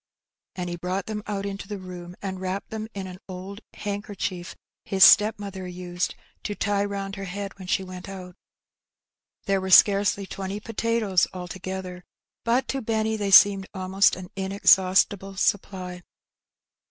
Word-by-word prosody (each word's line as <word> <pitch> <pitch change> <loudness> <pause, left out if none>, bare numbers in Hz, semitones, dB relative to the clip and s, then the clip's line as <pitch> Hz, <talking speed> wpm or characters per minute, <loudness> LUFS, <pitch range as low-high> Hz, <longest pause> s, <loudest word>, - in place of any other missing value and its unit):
And 180 -1 -4
he 175 0 -4
brought 180 +2 -3
them 215 -1 -4
out 200 -1 -3
into 200 0 -5
the 205 0 -5
room, 180 -1 -9
and 190 -1 -4
wrapped 190 +1 -4
them 220 0 -4
in 195 -1 -4
an 185 0 -9
old 190 +3 -7
handkerchief 200 -3 -4 0.3
his 190 -1 +3
stepmother 205 -3 +5
used 180 +1 -3 0.3
to 205 - -4
tie 200 0 0
round 200 -1 -4
ler 195 - -5
head 195 +1 -6
when 185 - -9
she 190 - +1
went 185 0 -9
out. 180 -2 -9 1.1
There 195 -2 +1
were 190 - -4
scarcely 200 +1 +5
twenty 195 +1 -5
potatoes 225 -4 +1
altogether, 185 0 -6 0.4
but 240 +3 +1
to 270 - -1
Benny 220 0 0
they 205 -2 -2
seemed 195 0 +7
almost 190 +1 +3
an 180 -1 -9
inexhaustible 195 0 +3
supply. 185 -3 -1
195 Hz, 150 wpm, -25 LUFS, 185-205 Hz, 1.1 s, seemed